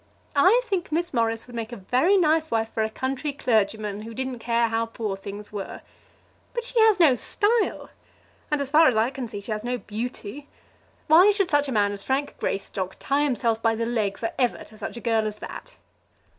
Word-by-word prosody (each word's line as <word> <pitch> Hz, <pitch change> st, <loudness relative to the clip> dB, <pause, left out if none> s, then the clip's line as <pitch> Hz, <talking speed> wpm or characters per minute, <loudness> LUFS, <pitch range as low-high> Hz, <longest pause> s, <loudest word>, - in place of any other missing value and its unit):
I 375 Hz, +12 st, +5 dB
think 385 Hz, -9 st, -2 dB
Miss 340 Hz, +2 st, -1 dB
Morris 230 Hz, -2 st, 0 dB
would 245 Hz, -, -12 dB
make 230 Hz, 0 st, -4 dB
a 240 Hz, -, -6 dB
very 255 Hz, -, +2 dB
nice 315 Hz, -2 st, +2 dB
wife 225 Hz, -1 st, 0 dB
for 225 Hz, -, -2 dB
a 220 Hz, -, 0 dB
country 265 Hz, +5 st, -3 dB
clergyman 215 Hz, -6 st, 0 dB
who 225 Hz, +1 st, -8 dB
didn't 260 Hz, -1 st, -3 dB
care 235 Hz, 0 st, +1 dB
how 225 Hz, 0 st, 0 dB
poor 220 Hz, -3 st, -4 dB
things 200 Hz, +2 st, -9 dB
were. 200 Hz, -2 st, -6 dB, 0.7 s
But 475 Hz, -, -1 dB
she -, -, 0 dB
has 440 Hz, -3 st, +5 dB
no 315 Hz, -6 st, +7 dB
style; 425 Hz, -, 0 dB, 0.6 s
and 295 Hz, -, +1 dB
as 280 Hz, -1 st, -2 dB
far 315 Hz, +1 st, +7 dB
as 245 Hz, -, +3 dB
I 225 Hz, +4 st, +2 dB
can 265 Hz, -3 st, -5 dB
see, 205 Hz, -2 st, -7 dB
she 210 Hz, -, -6 dB
has 215 Hz, 0 st, -3 dB
no 245 Hz, +1 st, -1 dB
beauty. 240 Hz, +4 st, -6 dB, 0.6 s
Why 340 Hz, +6 st, +7 dB
should 400 Hz, -3 st, +1 dB
such 290 Hz, -1 st, +3 dB
a -, -, -3 dB
man 205 Hz, -3 st, +2 dB
as 200 Hz, -1 st, -6 dB
Frank 275 Hz, +2 st, -1 dB
Greystock 190 Hz, -1 st, -3 dB
tie 285 Hz, +2 st, +1 dB
himself 235 Hz, -4 st, 0 dB
by 225 Hz, 0 st, +2 dB
the 230 Hz, +1 st, -1 dB
leg 220 Hz, -4 st, -1 dB
for 225 Hz, -, -3 dB
ever 245 Hz, -2 st, +1 dB
to 215 Hz, -, -16 dB
such -, -, -6 dB
a -, -, -7 dB
girl 225 Hz, -2 st, +1 dB
as 210 Hz, -, -4 dB
that? -, -, -9 dB
240 Hz, 210 wpm, -25 LUFS, 220-295 Hz, 0.7 s, no